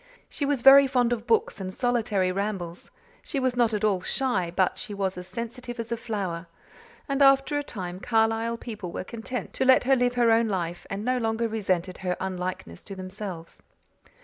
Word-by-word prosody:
She 285 - -3
was 280 -4 0
very 275 +1 +9
fond 245 -2 +2
of 235 +1 -5
books 450 - +1
and 185 -1 -4
solitary 220 -5 0
rambles; 190 -3 -4 0.3
she 280 - -3
was 255 -1 0
not 240 -2 +3
at 210 -1 -2
all 200 -4 +2
shy 195 -6 0
but 185 -2 +1
she 210 -4 -5
was 195 -1 -1
as 180 0 -7
sensitive 235 +4 -6
as 230 0 -5
a - - +1
flower; 195 -7 -4 0.6
and 275 -1 -1
after 275 +1 +5
a - - -3
time 185 -8 -6
Carlisle 225 +1 +1
people 210 -7 -7
were - - -4
content 235 +4 -6
to - - 0
let 260 0 +6
her 270 +2 +4
live 245 -1 +1
her 240 -2 +4
own 225 0 +4
life 175 -4 -3
and 200 +2 -4
no 255 0 +1
longer 225 0 0
resented 190 -5 -1
her 180 -1 -2
unlikeness 180 - -5
to 195 - -8
themselves. 185 -3 -7
225 Hz, 195 wpm, -26 LUFS, 185-245 Hz, 0.6 s, very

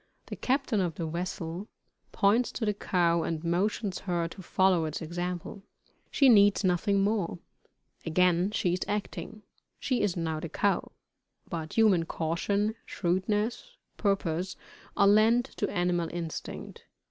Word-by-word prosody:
The - - -6
captain 260 -5 0
of 175 -3 -1
the 170 - -3
vessel 170 +2 -4 0.4
points 220 +5 +2
to 225 - -2
the 210 - +1
cow 170 -4 +1
and 160 0 -3
motions 190 +3 0
her 175 -3 -1
to 190 - -10
follow 185 -2 +2
its 155 0 -4
example. 175 +3 -4 0.5
She 275 - +4
needs 205 -4 +6
nothing 195 +2 +2
more. 200 -4 0 0.7
Again 180 +2 +2
she 210 -4 0
is 180 - -1
acting 210 +1 -4 0.4
she 255 -3 0
is 195 -3 0
now 160 -2 -2
the 165 - -5
cow; 200 +5 0 0.6
but 160 -2 -5
human 205 -7 +4
caution, 200 +7 -1
shrewdness, 210 - -1 0.2
purpose, 185 -3 -1 0.4
are 200 - +5
lent 220 +4 +5
to - - 0
animal 175 -1 0
instinct. 170 -2 -6
185 Hz, 135 wpm, -29 LUFS, 170-210 Hz, 0.7 s, needs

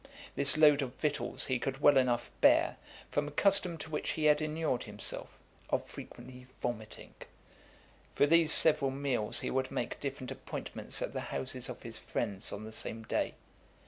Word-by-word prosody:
This 140 +1 +4
load 150 -2 +6
of 130 -1 -4
victuals 150 -2 -1
he 130 -2 0
could 135 +2 -3
well 145 -1 +6
enough 125 -2 +2
bear, - - +5 0.3
from 145 0 0
a - - -6
custom 185 +1 +3
to 160 0 -8
which 150 - -2
he 155 - -2
had 150 0 +5
enured 155 -4 -1
himself, - - -3 0.4
of - - 0
frequently 125 0 -11
vomiting. 110 -3 -5 1.0
For - - +5
these 165 +1 +4
several 150 -5 +5
meals 135 -5 -1
he - - -2
would 130 0 0
make 130 -3 -3
different 135 -2 -5
appointments - - -5
at - - -4
the - - -3
houses 130 -1 -4
of 125 - -8
his 115 -1 -6
friends 100 -5 -1
on 105 - -6
the 110 - -8
same 110 0 -4
day. - - -1
135 Hz, 175 wpm, -32 LUFS, 120-150 Hz, 1.0 s, load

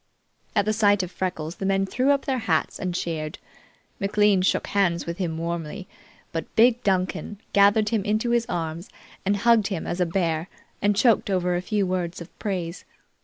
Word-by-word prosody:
At - - +3
the 215 - +1
sight 205 -2 +3
of 180 - -6
Freckles 175 -3 -4
the 195 - -4
men 195 0 +2
threw 255 +7 0
up 280 -1 +2
their 265 -2 0
hats 220 - 0
and 180 -2 -3
cheered. 155 -3 -3 0.6
McLean 200 -1 +3
shook 185 - +1
hands 175 -4 +1
with 170 +2 -5
him 165 -4 -2
warmly, 170 +2 -4 0.4
but 165 - -5
big 240 +1 +5
Duncan 190 +1 -1
gathered 205 +1 +5
him 220 -3 0
into 215 +3 0
his 235 0 +2
arms 165 0 -3 0.4
and 200 +1 +2
hugged 225 -1 +4
him 190 -6 -3
as 175 - -2
a 180 - +2
bear 165 -1 -1 0.3
and 205 0 +2
choked 225 0 +3
over 180 -2 +1
a 175 - -1
few 205 +1 0
words 180 -2 -2
of 170 - -12
praise. 180 -4 -3
195 Hz, 185 wpm, -25 LUFS, 170-210 Hz, 0.6 s, big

